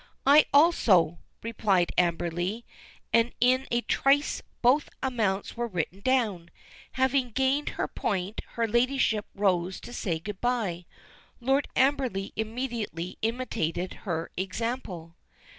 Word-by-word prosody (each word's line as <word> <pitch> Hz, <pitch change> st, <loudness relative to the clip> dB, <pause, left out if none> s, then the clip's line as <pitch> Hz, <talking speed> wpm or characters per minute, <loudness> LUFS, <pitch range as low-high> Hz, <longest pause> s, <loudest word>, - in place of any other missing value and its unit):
"I 290 Hz, +3 st, +7 dB
also," 210 Hz, -, +4 dB, 0.2 s
replied 205 Hz, -6 st, +1 dB
Amberley, 175 Hz, +5 st, 0 dB, 0.5 s
and 230 Hz, +1 st, +3 dB
in 255 Hz, +2 st, +3 dB
a 240 Hz, 0 st, +1 dB
trice 280 Hz, +4 st, +2 dB, 0.2 s
both 265 Hz, +5 st, +4 dB
amounts 215 Hz, -7 st, -1 dB
were 240 Hz, 0 st, -2 dB
written 180 Hz, -1 st, -3 dB
down. 210 Hz, -8 st, 0 dB, 0.4 s
Having 260 Hz, -2 st, +1 dB
gained 265 Hz, +3 st, +1 dB
her -, -, 0 dB
point, 195 Hz, +1 st, -3 dB
her 230 Hz, -1 st, 0 dB
ladyship 235 Hz, -2 st, +1 dB
rose 185 Hz, -2 st, +1 dB
to 240 Hz, -, -10 dB
say 175 Hz, -9 st, -2 dB
good 195 Hz, +4 st, -7 dB
bye. 210 Hz, -9 st, -1 dB, 0.5 s
Lord 270 Hz, +3 st, +1 dB
Amberley 260 Hz, -8 st, +1 dB
immediately 220 Hz, -6 st, -4 dB
imitated 215 Hz, -7 st, -2 dB, 0.2 s
her 165 Hz, -1 st, -2 dB
example. 185 Hz, -4 st, -4 dB
225 Hz, 115 wpm, -28 LUFS, 185-255 Hz, 0.5 s, I